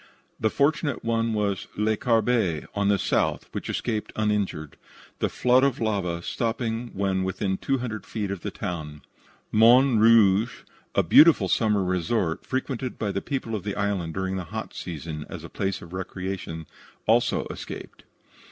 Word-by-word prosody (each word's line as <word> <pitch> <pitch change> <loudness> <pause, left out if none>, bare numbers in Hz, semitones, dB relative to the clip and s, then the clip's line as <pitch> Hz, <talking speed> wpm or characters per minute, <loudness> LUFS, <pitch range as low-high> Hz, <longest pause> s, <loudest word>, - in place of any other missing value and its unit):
The 110 - +2
fortunate 145 0 0
one 115 0 +1
was 100 -2 -1
Le 110 +1 +2
Carbet, 110 - +1
on 100 -1 0
the 100 0 +4
south, - - 0
which - - -5
escaped 110 -3 -2
uninjured, 105 -8 -1 0.4
the - - +1
flood 125 +1 +3
of 140 -3 +2
lava 95 -6 -1
stopping 115 +1 -2
when 95 -1 0
within 95 +1 -1
two 135 +7 -1
hundred 115 -4 -5
feet 105 -3 -3
of 100 -3 -4
the - - -3
town. 80 -7 -6 0.5
Morne 120 +2 +6
Rouge, 110 0 +5 0.3
a - - +4
beautiful 150 - +7
summer 105 -1 +2
resort, 90 0 -1
frequented 130 -1 -3
by 105 -2 -1
the 100 - -2
people 130 -5 -3
of 105 - -2
the 100 -1 -3
island 100 -6 -1
during 95 0 -2
the 90 - -4
hot - - -6
season 80 -2 -6
as - - -7
a - - -8
place 95 -1 -3
of 85 +1 -12
recreation, 95 -3 -5 0.4
also - - +2
escaped. - - -8
105 Hz, 160 wpm, -25 LUFS, 95-115 Hz, 0.5 s, beautiful